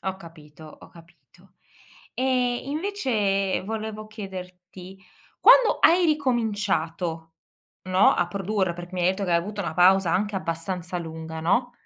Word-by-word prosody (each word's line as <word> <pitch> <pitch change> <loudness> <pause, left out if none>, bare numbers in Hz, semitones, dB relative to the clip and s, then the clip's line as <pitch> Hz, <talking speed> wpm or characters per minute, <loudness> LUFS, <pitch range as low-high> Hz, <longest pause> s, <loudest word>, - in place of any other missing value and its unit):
Ho 190 0 -4
capito, 160 -4 -14 0.2
ho - - -14
capito. 170 0 -18 1.0
E, 250 -2 0
invece, 240 - -1
volevo 215 0 -5
chiederti 185 -2 -10 0.4
quando - - +6
hai 350 +2 +5
ricominciato, 205 - -1 0.5
no, 185 +1 +4
a 175 - 0
produrre 195 -1 -2
perché 175 +1 -9
mi 180 - -2
hai 175 - +3
etto 190 +2 -1
che 180 - -3
hai - - +5
avuto 205 +4 -5
una 165 -3 -4
pausa 180 0 +4
anche 205 +2 0
abbastanza 180 0 -4
lunga, 160 -1 -7
no? 240 +9 +1
190 Hz, 135 wpm, -24 LUFS, 175-215 Hz, 1.0 s, quando